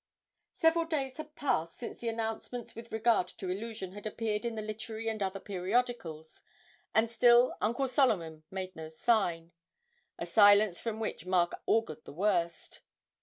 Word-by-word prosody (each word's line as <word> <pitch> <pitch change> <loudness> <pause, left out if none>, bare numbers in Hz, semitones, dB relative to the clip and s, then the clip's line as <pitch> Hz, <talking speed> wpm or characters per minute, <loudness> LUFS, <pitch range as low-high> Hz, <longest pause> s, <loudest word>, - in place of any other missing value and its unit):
Several 330 +1 +3
days 275 -5 -2
had 310 -1 -8
passed 165 - -1
since 235 - -7
the 235 - -3
announcements 225 +1 -4
with 230 +1 -10
regard 220 -4 +2
to 185 - -5
'Illusion' 205 -1 -5
had 205 +2 -7
appeared 215 0 -2
in 235 -1 -2
the 215 - -3
literary 220 +1 -5
and 220 -1 -2
other 195 0 -1
periodicals, 185 -5 -2 0.5
and 220 +1 +3
still 240 +2 +5
Uncle 240 +5 +1
Solomon 190 - +1
made 190 -1 -5
no 160 -1 -7
sign 170 -2 +1 0.7
a - - -4
silence 205 -3 +6
from 225 -2 -4
which 200 -5 -4
Mark 180 -2 +2
augured 155 -9 +1
the - - -10
worst. 170 -2 -1
215 Hz, 155 wpm, -31 LUFS, 185-235 Hz, 0.7 s, silence